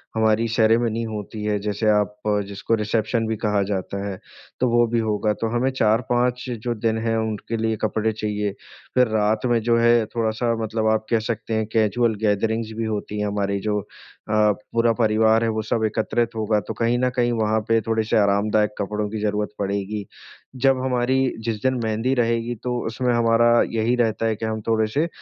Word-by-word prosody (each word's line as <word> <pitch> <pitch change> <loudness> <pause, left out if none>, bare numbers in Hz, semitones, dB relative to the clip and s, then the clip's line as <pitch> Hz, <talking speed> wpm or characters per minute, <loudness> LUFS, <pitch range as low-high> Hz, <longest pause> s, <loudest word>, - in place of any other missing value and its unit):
हमारी 110 +1 +2
सेरेमनी 115 0 +2
होती 105 -1 -6
है 105 -1 0
जैसे 105 +1 -1
आप 105 0 +2
अ, 105 -1 +2
जिसको 100 +3 -3
रिसेप्शन 110 +1 -1
भी 110 - -1
कहा 105 -2 0
जाता 100 +1 -3
है, 95 -2 -5 0.4
तो 125 -1 +2
वो 120 0 +4
भी 120 - +2
होगा। 105 -1 0
तो 115 - +1
हमें 130 +3 +2
4-5 120 +2 +1 0.2
जो 120 -1 0
दिन 110 0 0
है 115 0 +1
उनके 110 +1 -3
लिए 110 0 0
कपड़े 110 0 0
चाहिए। 105 -1 -2 0.4
फिर 125 -2 +5
रात 110 +1 +1
में 120 -1 +2
जो 115 +1 +2
है 120 -1 +4
थोड़ा-सा 115 +1 0
मतलब 110 0 -1
आप 110 0 -1
कह 115 -2 +3
सकते 115 0 -3
हैं 110 0 0
कैज़ुअल 115 +1 +2
गैदरिंग्स 110 +2 0
भी 115 - -1
होती 105 -1 -3
है 105 - 0
हमारी 100 -1 -1
जो 105 0 -1 0.5
अ, - - -1 0.4
पूरा 115 0 +3
परिवार 110 0 +3
है 115 - +1
वो 110 0 -1
सब 110 +1 -1
एकत्रित 110 +2 0
होगा 110 -1 +1
तो 110 - -3
कहीं 115 +2 +1
न 125 0 +2
कहीं 120 -1 +2
वहाँ 110 -1 +1
पे 115 0 +3
थोड़े-से 110 -1 0
आरामदायक 105 +1 +2
कपड़ों 105 +1 -2
की 110 0 -4
ज़रूरत 105 0 -1
पड़ेगी। 100 +1 -2 0.6
जब 135 -1 +4
हमारी 125 0 +1 0.3
जिस 110 -3 -2
दिन 130 0 +2
मेहंदी 110 +4 0
रहेगी 115 0 0
तो 125 -1 -1
उसमें 120 +2 0
हमारा 115 0 +3 0.3
यही 115 +2 +2
रहता 115 -2 0
है 110 -1 +1
कि 110 - -5
हम 110 0 -3
थोड़े-से 115 +8 +1
110 Hz, 190 wpm, -22 LUFS, 105-115 Hz, 0.6 s, फिर